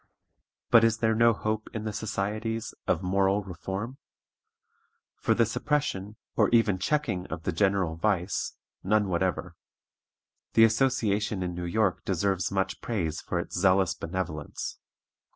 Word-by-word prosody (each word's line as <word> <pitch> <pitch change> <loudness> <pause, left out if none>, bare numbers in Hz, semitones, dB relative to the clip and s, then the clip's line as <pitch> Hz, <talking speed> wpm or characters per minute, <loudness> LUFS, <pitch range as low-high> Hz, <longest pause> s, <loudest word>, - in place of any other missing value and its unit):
"But 115 -1 +8
is 115 0 +3
there 110 -1 +2
no 115 +1 +5
hope 110 0 -2
in 110 - -3
the 110 -1 -3
societies 110 +2 -3
of - - +1
moral 95 +2 +2
reform? 95 - -5 1.2
For - - +1
the - - +4
suppression, 105 -9 -1 0.2
or - - +4
even 110 -5 +3
checking 120 -7 0
of 80 +1 -6
the - - 0
general 95 -5 +1
vice, 95 -1 0 0.3
none 105 +1 +2
whatever. 90 0 -1 1.0
The 115 - +7
association 110 -4 +2
in 90 -1 -3
New 90 0 -4
York 95 +1 +1
deserves 95 -2 0
much 95 -1 -1
praise 85 -9 -2
for 90 - -3
its 85 - -4
zealous 95 0 +3
benevolence. 80 -4 -5
100 Hz, 135 wpm, -28 LUFS, 90-110 Hz, 1.2 s, But